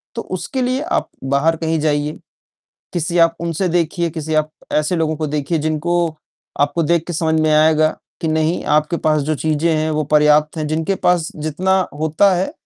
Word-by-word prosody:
तो -, -, -3 dB
उसके 265 Hz, -, -4 dB
लिए 255 Hz, +2 st, 0 dB
आप 335 Hz, -, -1 dB, 0.2 s
बाहर 155 Hz, +4 st, +2 dB
कहीं 160 Hz, -1 st, -1 dB
जाइए, 150 Hz, 0 st, -1 dB, 0.7 s
किसी 170 Hz, 0 st, -1 dB
आप 165 Hz, 0 st, +4 dB
उनसे 170 Hz, +2 st, -1 dB
देखिए, 170 Hz, 0 st, 0 dB
किसी 155 Hz, 0 st, -4 dB
आप 155 Hz, 0 st, +1 dB, 0.2 s
ऐसे 155 Hz, +4 st, +1 dB
लोगों 160 Hz, -1 st, 0 dB
को 155 Hz, 0 st, -2 dB
देखिए 150 Hz, +2 st, -1 dB
जिनको 160 Hz, +2 st, -1 dB, 0.4 s
आपको 145 Hz, +4 st, +1 dB
देख 165 Hz, +1 st, +1 dB
के 175 Hz, -, -4 dB
समझ 160 Hz, 0 st, +1 dB
में 155 Hz, 0 st, +2 dB
आएगा 155 Hz, 0 st, +4 dB, 0.3 s
कि 160 Hz, -, -1 dB
नहीं, 160 Hz, +2 st, 0 dB
आपके 150 Hz, +3 st, +1 dB
पास 155 Hz, -2 st, +1 dB
जो 155 Hz, +2 st, -1 dB
चीज़ें 160 Hz, +2 st, 0 dB
हैं, 155 Hz, +1 st, 0 dB
वो 155 Hz, -1 st, 0 dB
पर्याप्त 150 Hz, +1 st, +4 dB
हैं। 155 Hz, -1 st, -2 dB
जिनके 160 Hz, +5 st, -1 dB
पास 175 Hz, -3 st, +1 dB
जितना 170 Hz, +5 st, 0 dB, 0.2 s
होता 160 Hz, +6 st, +3 dB
है, 190 Hz, -, -1 dB
160 Hz, 185 wpm, -18 LUFS, 155-170 Hz, 0.7 s, आप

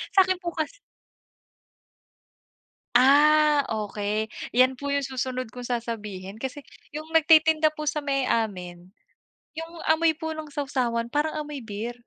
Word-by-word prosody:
Sa'kin 375 Hz, -1 st, +4 dB
po 345 Hz, -2 st, -5 dB
kas 315 Hz, +4 st, -2 dB, 2.2 s
Ah, 295 Hz, +3 st, +6 dB, 0.2 s
okey, 210 Hz, +2 st, -2 dB, 0.2 s
'yan 255 Hz, +2 st, +4 dB
po 280 Hz, +2 st, -4 dB
yung 280 Hz, -, +2 dB
susunod 255 Hz, -1 st, -3 dB
kong 245 Hz, +2 st, -9 dB
sasabihin. 215 Hz, -5 st, -5 dB
Kasi 265 Hz, +5 st, -5 dB, 0.3 s
yung 305 Hz, +2 st, -7 dB
nagtitinda 315 Hz, -1 st, +5 dB
po 305 Hz, -1 st, -6 dB
sa 300 Hz, 0 st, -1 dB
may 275 Hz, -2 st, 0 dB
amin, 180 Hz, -5 st, -2 dB, 0.6 s
yung 325 Hz, +1 st, -7 dB
amoy 320 Hz, 0 st, +3 dB
po 320 Hz, 0 st, -4 dB
ng 310 Hz, -1 st, -7 dB
sawsawan 255 Hz, -5 st, -1 dB
parang 305 Hz, +1 st, 0 dB
amoy 290 Hz, -4 st, -7 dB
beer. 220 Hz, +2 st, -5 dB
275 Hz, 130 wpm, -25 LUFS, 230-310 Hz, 2.2 s, Ah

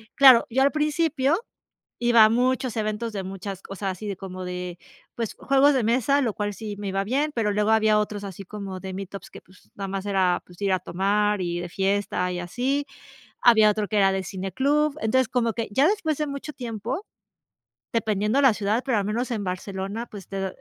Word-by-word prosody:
claro, 260 Hz, -3 st, +8 dB
yo 260 Hz, +3 st, +1 dB
al 280 Hz, +1 st, +4 dB
principio, 305 Hz, -1 st, +1 dB, 0.7 s
iba 235 Hz, -2 st, +7 dB
a 215 Hz, -, +5 dB
muchos 250 Hz, 0 st, +1 dB
eventos 215 Hz, +1 st, -2 dB
de 195 Hz, -, -3 dB
muchas 195 Hz, 0 st, -6 dB
o 195 Hz, -, -7 dB
sea, 195 Hz, 0 st, -2 dB
así 200 Hz, +1 st, -5 dB
como 185 Hz, -1 st, -7 dB
de, 180 Hz, -1 st, -5 dB, 0.4 s
pues, 230 Hz, -3 st, -3 dB
juegos 275 Hz, +2 st, +4 dB
de 255 Hz, -, +2 dB
mesa, 260 Hz, +5 st, +2 dB
lo 235 Hz, -4 st, 0 dB
cual 205 Hz, 0 st, -3 dB
sí 210 Hz, 0 st, -6 dB
me 205 Hz, -, -4 dB
iba 195 Hz, +1 st, -1 dB
bien, 280 Hz, +8 st, 0 dB
pero 215 Hz, -3 st, +1 dB
luego 210 Hz, +1 st, +2 dB
había 220 Hz, -1 st, +4 dB
otros 210 Hz, -1 st, -2 dB
así 195 Hz, 0 st, -7 dB
como 195 Hz, -1 st, -7 dB
de 190 Hz, -1 st, -6 dB
Meetups 195 Hz, +1 st, -7 dB
que, -, -, -12 dB
pues, 185 Hz, 0 st, -22 dB
nada 195 Hz, -, -5 dB
más 195 Hz, +1 st, -4 dB
era, 190 Hz, -3 st, +1 dB
pues, 175 Hz, -1 st, -17 dB
ir 195 Hz, -, +2 dB
a 185 Hz, -, +3 dB
tomar 205 Hz, +3 st, 0 dB
y 175 Hz, 0 st, -2 dB
de 175 Hz, -, -5 dB
fiesta 195 Hz, -1 st, 0 dB
y 180 Hz, -, -3 dB
así. 260 Hz, +10 st, -1 dB, 0.5 s
Había 220 Hz, -3 st, +6 dB
otro 210 Hz, -1 st, -1 dB
que 215 Hz, -, -2 dB
era 195 Hz, -1 st, +4 dB
de 190 Hz, -1 st, -2 dB
cine 190 Hz, -1 st, -5 dB
club. 295 Hz, +5 st, +2 dB
Entonces, 255 Hz, +4 st, +2 dB
como 235 Hz, -3 st, 0 dB
que 230 Hz, -1 st, -3 dB
ya 270 Hz, +9 st, +4 dB
después 335 Hz, -8 st, 0 dB
de 300 Hz, -, 0 dB
mucho 280 Hz, +1 st, -6 dB
tiempo, 245 Hz, -, -5 dB, 0.9 s
dependiendo 215 Hz, +2 st, +1 dB
la 265 Hz, -5 st, +5 dB
ciudad, 210 Hz, +4 st, 0 dB
pero 255 Hz, -5 st, +2 dB
al 200 Hz, -, 0 dB
menos 235 Hz, +5 st, -2 dB
en 220 Hz, -3 st, -2 dB
Barcelona, 195 Hz, +4 st, -4 dB
pues, 200 Hz, -4 st, -11 dB
te 195 Hz, -1 st, -3 dB
210 Hz, 210 wpm, -25 LUFS, 195-250 Hz, 0.9 s, claro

